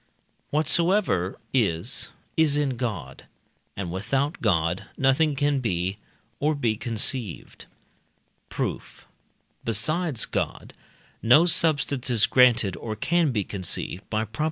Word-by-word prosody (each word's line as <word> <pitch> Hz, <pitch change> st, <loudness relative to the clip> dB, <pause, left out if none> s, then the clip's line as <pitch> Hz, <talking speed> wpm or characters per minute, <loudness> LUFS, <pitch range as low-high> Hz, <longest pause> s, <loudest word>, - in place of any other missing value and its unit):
Whatsoever 160 Hz, -, +2 dB, 0.2 s
is, 115 Hz, 0 st, 0 dB, 0.3 s
is 155 Hz, -3 st, +3 dB
in 140 Hz, -3 st, 0 dB
God, 105 Hz, -, -5 dB, 0.5 s
and 95 Hz, -3 st, -4 dB
without 135 Hz, -, -2 dB
God 85 Hz, -4 st, 0 dB
nothing 140 Hz, +3 st, +2 dB
can 145 Hz, 0 st, +1 dB
be, 95 Hz, -4 st, -2 dB, 0.4 s
or 150 Hz, +1 st, +1 dB
be 120 Hz, -6 st, 0 dB
conceived. 115 Hz, -2 st, -2 dB, 0.8 s
Proof. -, -, -5 dB, 0.6 s
Besides 145 Hz, -, +1 dB
God, -, -, -4 dB, 0.5 s
no 130 Hz, +9 st, +6 dB
substance 145 Hz, -6 st, +2 dB
is 115 Hz, -4 st, +4 dB
granted 120 Hz, -7 st, +4 dB
or 110 Hz, -2 st, -5 dB
can 170 Hz, +3 st, +1 dB
be 105 Hz, -5 st, -1 dB
conceived 95 Hz, -1 st, -3 dB
(by 110 Hz, 0 st, -1 dB
Prop. 110 Hz, +1 st, -14 dB
120 Hz, 110 wpm, -25 LUFS, 100-145 Hz, 0.8 s, no